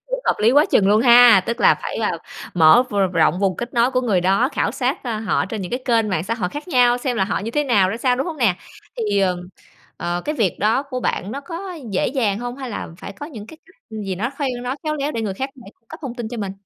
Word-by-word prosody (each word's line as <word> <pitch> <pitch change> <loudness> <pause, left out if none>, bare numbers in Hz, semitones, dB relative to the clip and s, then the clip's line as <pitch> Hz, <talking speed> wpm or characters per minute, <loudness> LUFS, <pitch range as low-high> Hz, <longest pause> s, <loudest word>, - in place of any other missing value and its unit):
cũng - - -2
hợp - - +2
lý 215 +2 +4
quá 290 +2 +6
chừng 195 - +4
luôn 210 +2 +4
ha. 240 -4 +8
Tức 235 +1 -3
là - - +6
phải, - - -4
à, - - 0 0.4
mở 165 +7 +6
v - - -7 0.2
rộng 165 +1 +2
vùng 195 -2 0
kết 240 +1 -6
nối 240 +1 +3
của 255 -1 +1
người 215 -8 +1
đó, 195 +8 +2
khảo - - 0
sát, - - -2
ơ, 230 -3 -2
họ 215 -3 0
trên 205 0 -5
những 180 - -6
cái 245 - -2
kênh 230 -4 +2
mạng 180 -4 -1
xã 225 +4 -2
hội 200 -6 -2
khác 295 - -8
nhau 245 -5 +4
xem 250 -1 -2
là 195 - +2
họ 200 - -2
như 215 +3 -5
thế 295 +5 0
nào, 205 -8 +3
ra 215 - -3
sao, 250 +1 +1
đúng 270 - -2
hông 335 -3 -5
nè? 225 -10 +2 0.4
Thì, 210 -4 0
ừm, 180 -2 -1 0.5
ờ, 175 +1 -3
cái 300 - -2
việc 220 - 0
đó 220 +6 +2
của 260 -3 -5
bạn 205 -3 -2
nó 275 - -5
có 355 +5 -7 0.2
dễ 190 - 0
dàng 225 -7 0
hông? 245 +2 -5
Hay 265 -3 -6
là - - -5
phải - - -8
có 245 +9 -8
những 225 -10 -9
cái 315 - -12
cách 380 - -23
gì 210 -3 -4
nó 220 +7 -2
kheo 285 -3 0
nói 255 +2 -3
khéo 305 0 -1
léo 295 0 -2
để 230 - -3
người 200 -3 -3
khác 265 +7 -4
phải 215 - -13
cung 230 - -46
cấp 320 - -9
thông 260 -4 -5
tin 240 -3 -5
cho 240 - -6
mình? 200 -3 -4
235 Hz, 290 wpm, -20 LUFS, 200-260 Hz, 0.5 s, ha